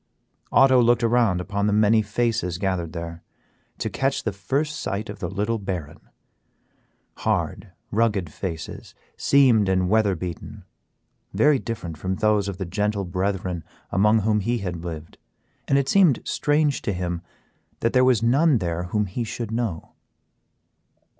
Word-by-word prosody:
Otto 130 -2 +6
looked 120 0 +3
around 115 -6 +2
upon 100 +2 -1
the 105 - +1
many 110 +1 +4
faces 110 -4 -1
gathered 90 -4 -2
there 85 -1 -6 0.6
to - - -3
catch 135 +1 -1
the 110 - -1
first 145 +9 -2
sight 105 +4 -3
of - - -11
the 85 - -3
little 105 +4 -1
baron; 90 -7 -5 1.2
hard, - - -2 0.2
rugged 100 -8 0
faces, 85 -4 -6 0.2
seamed 125 -8 +4
and 95 -1 +1
weather 110 -3 +3
beaten; 85 0 -7 0.7
very 145 -2 +4
different 100 - -6
from 95 +2 -2
those 105 -1 +2
of 100 -2 -4
the 95 - -3
gentle 100 +2 -1
brethren 90 -1 -2 0.3
among 105 +4 +3
whom 105 +1 +2
he 120 +4 0
had 90 -5 -4
lived, 80 -2 -7 0.5
and 140 - +3
it 140 -1 +1
seemed 175 -6 +4
strange 150 -1 +1
to 105 - -2
him 90 -1 -3 0.6
that 115 - +1
there 130 -1 +5
was 125 -4 +3
none 140 +4 +4
there 85 -3 -2
whom 105 +4 0
he 100 +6 -4
should 115 0 -5
know. 115 -8 -3
105 Hz, 150 wpm, -24 LUFS, 90-120 Hz, 1.2 s, Otto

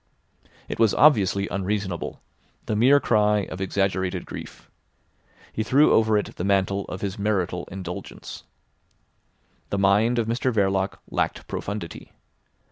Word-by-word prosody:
It - - -5
was 115 -3 +4
obviously 100 -9 +4
unreasonable, 100 -2 -3 0.4
the 110 - -1
mere 130 +6 +5
cry 105 -4 +2
of 95 - -6
exaggerated 95 -1 -1
grief. - - -9 0.9
He - - -2
threw 140 +7 +4
over 110 -1 +4
it 105 - -4
the - - -3
mantle 100 0 +1
of 90 - -7
his 100 +1 -4
marital 95 -4 -1
indulgence. 90 -2 -7 1.3
The 100 - -1
mind 105 +5 +3
of 115 - +1
Mr 120 +3 0
Verloc 95 -3 0
lacked - - -2
profundity. 100 -5 -6
100 Hz, 125 wpm, -24 LUFS, 95-110 Hz, 1.3 s, mere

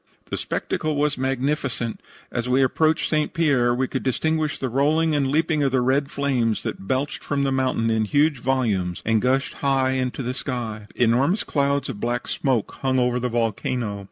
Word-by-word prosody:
"The - - -1
spectacle 155 -1 -2
was 145 0 +1
magnificent. 130 -3 -2 0.3
As 120 +1 -2
we 130 +2 +4
approached 155 +5 +2
St. 155 -1 0
Pierre 140 -7 +3
we 130 +1 0
could 130 - -3
distinguish 155 +4 0
the 130 - -2
rolling 150 +6 +2
and 140 -2 +1
leaping 155 +2 +1
of 135 -2 +2
the 130 -1 +2
red 135 +3 +1
flames 125 -6 0
that 95 - -5
belched 130 +5 -1
from 140 -1 -1
the 135 - +1
mountain 130 -4 +1
in 110 -1 +1
huge 145 +4 +2
volumes 110 -9 0
and 110 -1 +2
gushed 135 +2 +1
high 135 -2 +2
in 130 -1 0
to 130 - -6
the 125 +1 -2
sky. 115 -5 -4
Enormous 130 - +2
clouds 140 -1 0
of 120 -6 -6
black 120 +2 -2
smoke 130 -6 -1
hung 130 -1 +1
over 125 0 +2
the 125 0 -1
volcano. 115 -1 -1
130 Hz, 185 wpm, -23 LUFS, 120-140 Hz, 0.3 s, we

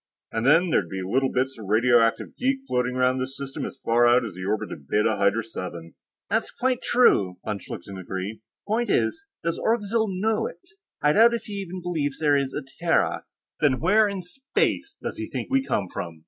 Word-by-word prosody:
And 115 +3 -1
then, 165 +4 +5
there'd 90 - +1
be 95 +1 -4
little 130 +7 +1
bits 130 0 -1
of 105 - -8
radioactive 115 +2 +3
geek 270 +1 0
floating 125 0 0
around 130 0 +2
this 130 +1 -4
system 135 0 -5
as 135 - -11
far 120 +1 +4
out 120 0 +4
as 105 - -6
the 90 +1 -7
orbit 105 +2 -1
of 70 - -9
Beta 105 +1 +2
Hydrae 100 +3 +2
VII." 85 -3 -6 0.3
"That's - - 0
quite 255 -1 -1
true," 100 - +3
von 105 -2 -2
Schlichten 95 +1 -8
agreed. 95 +3 -5
"The 110 - -44
point 230 +3 0
is, 320 0 0 0.2
does 170 0 -1
Orgzild 220 -1 +1
know 220 +1 +1
it? 170 - -12 0.4
I 150 0 +5
doubt 230 +4 +6
if 230 - -5
he 210 - -8
even 185 -1 -7
believes 155 -6 -2
there 150 -2 +3
is 140 -1 0
a - - -3 0.2
Terra." 170 -1 +2 0.3
"Then 140 -4 +3
where 210 +6 +4
in 195 -2 -5
Space 265 +10 -2
does - - -5
he - - -5
think - - -5
we 270 0 +3
come 100 - -1
from?" 85 -2 -6
135 Hz, 205 wpm, -25 LUFS, -, 0.4 s, doubt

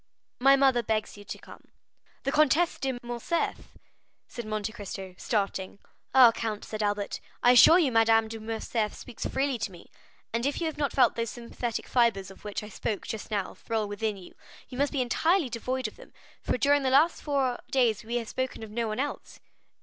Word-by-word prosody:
"My 270 +2 +6
mother 270 -3 +4
begs 215 -1 -2
you 205 - -12
to - - -6
come." - - -14 0.6
"The 275 - 0
Comtesse 305 +3 +3
de 265 -2 -2
Morcerf?" 240 +8 -3 0.5
said 235 -3 -7
Monte 215 0 -3
Cristo, 195 -3 -7
starting. 200 -3 -2 0.4
"Ah, 250 -3 +9
count," 220 -2 -4
said 215 0 -5
Albert, 205 -1 -1 0.2
"I 245 - +7
assure 285 +7 +8
you 310 -8 +3
Madame 225 -1 +4
de 225 0 -7
Morcerf 220 0 -2
speaks 245 - -6
freely 270 -2 -1
to 205 -2 -3
me, 175 -2 -15 0.4
and 230 +1 0
if 285 - -2
you 340 - -1
have 315 -2 -3
not 285 -2 0
felt 265 - +4
those 230 -1 -2
sympathetic 235 -1 -5
fibres 225 -6 +2
of 195 - -16
which 210 0 -4
I 210 - -8
spoke 210 0 -3
just 220 - -6
now 205 -3 -2
thrill 220 -2 -2
within 205 0 -2
you, 185 - -13 0.4
you 250 - -8
must 285 0 +2
be 265 -3 +1
entirely 320 - +2
devoid 250 +2 -2
of 215 - -12
them, - - -15 0.3
for - - -1
during 285 +2 +3
the 265 - +1
last 295 +6 +4
four 275 -4 0
days 240 -5 +2
we 235 +2 -4
have 235 -2 -2
spoken 260 -2 -3
of 215 - -9
no 230 +1 -1
one 215 +2 -3
else." 290 +2 -4
235 Hz, 200 wpm, -28 LUFS, 215-265 Hz, 0.6 s, Ah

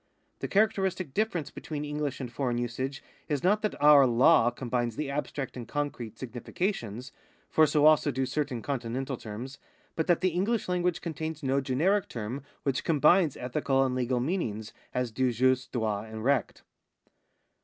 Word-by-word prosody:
The - - -3
characteristic 190 -6 +1
difference 195 -7 -1
between 150 -2 -5
EngUsh 150 -2 -3
and 125 -3 -6
foreign 125 -4 -1
usage 130 +4 -3 0.3
is 145 -3 -1
not 205 +4 +3
that 215 - -2
our 145 -2 +7
law 120 +1 +5
combines 120 -1 -2
the 145 0 -3
abstract 140 -1 -4
and 120 -2 -7
concrete 125 -7 -4
significations 125 - -4 0.4
(for 155 -1 +5
so 150 0 +3
also 155 -2 +5
do 130 +1 0
certain 130 -3 -2
Continental 130 0 -3
terms), 120 +5 -8 0.4
but 160 - -1
that 175 -2 +3
the 185 - +3
English 195 +6 0
language 180 -1 0
contains 160 -2 -5
no 135 +1 +1
generic 165 +10 +1
term 115 +4 -5 0.2
which 140 0 0
combines 160 +1 +4
ethical 135 +1 +1
and 130 - -1
legal 125 0 0
meanings 120 - -2 0.2
as 125 -2 -1
do 130 +2 +1
jus, 130 +1 +2
droit, 110 -4 -2
and 110 0 -6
recht. 135 -5 0
135 Hz, 160 wpm, -29 LUFS, 125-155 Hz, 0.4 s, our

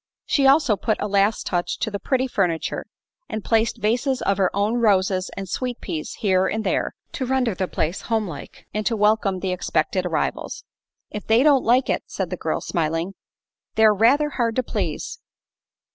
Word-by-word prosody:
She 275 -2 +3
also 275 -5 +5
put 215 +2 -1
a 210 - -1
last 200 +2 +2
touch 175 -1 -1
to 220 - -2
the 200 - -3
pretty 260 +5 0
furniture 180 -10 -1 0.4
and 215 - -4
placed 225 0 +2
vases 250 +5 +1
of 195 0 +1
her 185 -2 +3
own 210 +4 +1
roses 190 -4 +2
and 195 -1 -4
sweet 250 +5 -3
peas 160 -5 -5
here 190 -3 +3
and 220 0 -2
there, - - -1 0.2
to 260 - -3
render 255 -3 +1
the 185 0 -2
place 165 +2 -2
homelike 210 -11 -4
and 215 - -1
to 230 - 0
welcome 210 -3 +2
the 190 - -1
expected 180 0 0
arrivals. 165 - -2 0.5
"If 210 - -6
they 225 +3 +5
don't 285 -3 +5
like 250 +3 +3
it," - - 0
said - - -4
the - - -1
girl, - - -2
smiling, 165 +3 -1 0.6
"they're 220 -1 +6
rather 260 +9 +4
hard 230 -4 0
to 255 - +1
please." 195 -9 -3
210 Hz, 180 wpm, -23 LUFS, 185-240 Hz, 0.6 s, they're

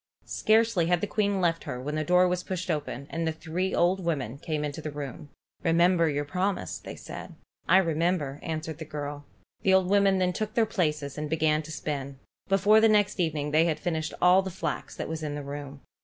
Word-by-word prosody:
Scarcely 220 -5 +2
had 175 0 +3
the 205 - -1
Queen 205 -2 0
left 165 -2 0
her 125 - -4
when 145 +4 -4
the 155 0 0
door 180 +3 +4
was 180 0 0
pushed 185 -1 -3
open, 145 -3 -3
and 165 0 -2
the - - +1
three 165 +4 -2
old 185 +2 +2
women 140 -7 -2
came 155 -1 -2
into 145 +2 -5
the 155 - -4
room. 145 0 -7 0.3
"Remember 170 0 +3
your 145 0 -1
promise," 185 +6 -2
said - - -8
they. - - -14 0.3
"I 185 - +7
remember," 165 -4 +1
answered 160 -1 -4
the - - -4
girl. 145 -1 -6 0.4
The 190 0 +4
old 190 -1 +3
women 200 -1 +4
then 180 -1 +1
took 215 +2 -3
their 230 - +4
places 150 -9 -1
and 150 -1 -3
began 155 -1 +2
to 155 0 -10
spin. 140 -3 -4 0.3
Before 205 +3 +5
the 225 - +6
next 205 -2 +2
evening 150 -4 0
they 155 +2 +4
had 155 -2 0
finished 160 -4 -2
all 180 +2 +7
the 190 - -5
flax 190 - -4
that - - -4
was 160 0 -4
in 150 -2 -3
the 145 - -5
room. 140 0 -7
165 Hz, 215 wpm, -27 LUFS, 150-185 Hz, 0.4 s, I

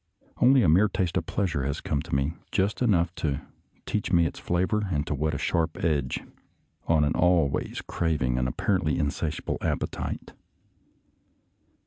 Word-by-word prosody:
Only 130 +1 +5
a - - +4
mere 95 +7 +5
taste 95 -3 -1
of 80 -2 -2
pleasure 85 -10 -1
has 70 +1 -2
come 70 - -1
to 80 -2 -3
me, 70 +3 0 0.2
just 100 +4 0
enough 90 -7 +2
to 75 -1 -1 0.4
teach 105 - -2
me 85 -2 +5
its - - -4
flavor 95 +4 0
and 75 -3 0
to - - -2
whet 75 +2 -1
a - - -1
sharp 80 +3 0
edge 75 -6 0 0.6
on 80 -2 +4
an 75 - +2
always 85 -5 +1
craving 70 -7 0
and 65 - +1
apparently 80 +4 0
insatiable 75 +1 -2
appetite. - - -3
80 Hz, 155 wpm, -27 LUFS, 75-90 Hz, 0.6 s, Only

